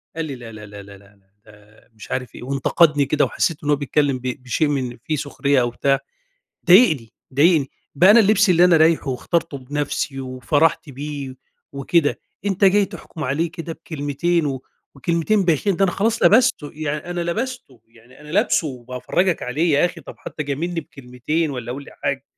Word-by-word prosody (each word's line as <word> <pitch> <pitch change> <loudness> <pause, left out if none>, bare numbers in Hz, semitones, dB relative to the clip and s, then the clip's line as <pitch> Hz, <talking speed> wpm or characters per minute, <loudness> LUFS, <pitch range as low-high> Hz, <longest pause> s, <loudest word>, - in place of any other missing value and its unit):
قال 165 0 -3
لي 140 -3 -6
لا 120 -2 -10
لا 105 -1 -10
لا 100 0 -11
لا 100 0 -13
لا 100 +1 -21
لا 95 -1 -34
ده 105 0 -20
مش 110 -2 -13
عارف 125 -3 -4
إيه، - - -9
وانتقدني 140 +3 +2
كده 145 +2 +2
وحسيت 165 - -1
إنه 150 - 0
هو - - +5
بيتكلم 140 -1 0
ب 125 - -19 0.2
بشيء 130 +5 0
من 130 -4 -2
في 155 - -2
سخرية 140 -1 0
أو 120 - 0
بتاع، 135 +3 +1 0.7
ضايقني، 165 - +5 0.2
ضايقني 150 0 +3 0.2
بقي 180 +8 +6
أنا 230 - +8
اللبس 205 -1 +4
اللي 175 0 +5
أنا 180 -2 +5
رايحه 160 -2 +3
واخترته 160 +3 -2
بنفسي 140 0 -3
وفَرَحت 140 +5 0
بيه 140 -1 -6 0.4
وكده، 145 +3 +1 0.3
أنت 200 0 +1
جاي 200 +1 +5
تحكُم 160 -4 -8
عليه 155 +6 -1
كده 165 -1 -6
بكلمتين، 160 +1 -2
و 135 -2 -4 0.3
وكلمتين 170 +8 0
بايخين، 175 +3 +1
ده 195 - +3
أنا 180 - 0
خلاص 225 +5 0
لبستُه، 215 - +4
يعني 150 +2 -4
أنا 175 - -3
لبستُه، 195 - -4
يعني 115 +3 -20
أنا 150 - -13
لابسُه 190 -1 +1
وبافرجك 130 +7 -2
عليه، 150 +7 0
يا 145 - +4
أخي 175 - -3
طب - - -11
حتى 155 - -6
جاملني 165 +4 -3
بكلمتين 140 +3 -3
والّا 125 -3 -5
قولي 140 +2 -9
حاجه، - - -3
145 Hz, 180 wpm, -21 LUFS, 130-170 Hz, 0.7 s, أنا